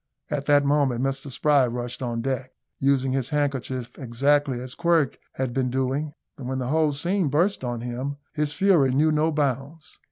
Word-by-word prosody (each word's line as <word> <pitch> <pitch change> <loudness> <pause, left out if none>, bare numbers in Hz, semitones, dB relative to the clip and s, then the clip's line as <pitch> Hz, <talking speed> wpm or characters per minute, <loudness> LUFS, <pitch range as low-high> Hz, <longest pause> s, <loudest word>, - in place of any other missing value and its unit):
At 145 -2 -2
that 145 -1 +5
moment 140 -4 +2
Mr 135 +1 -2
Spry 140 0 +3
rushed 120 +1 -4
on 120 -2 -2
deck, 130 -1 -3 0.3
using 135 -1 +2
his 130 -1 -1
handkerchief 135 -4 -2
exactly 140 +1 +1
as 125 0 -7
Quirk 170 -5 +1
had 130 -2 -2
been 130 -1 0
doing. 135 +4 -1 0.2
When 130 0 -4
the 125 -1 -2
whole 155 0 +2
scene 175 +5 0
burst 165 +5 +1
on 120 -2 -3
him, 125 +4 -4 0.2
his 150 -1 0
fury 170 -8 +3
knew 155 +3 +4
no 155 +1 +2
bounds. 145 +1 -3
135 Hz, 170 wpm, -25 LUFS, 130-150 Hz, 0.3 s, that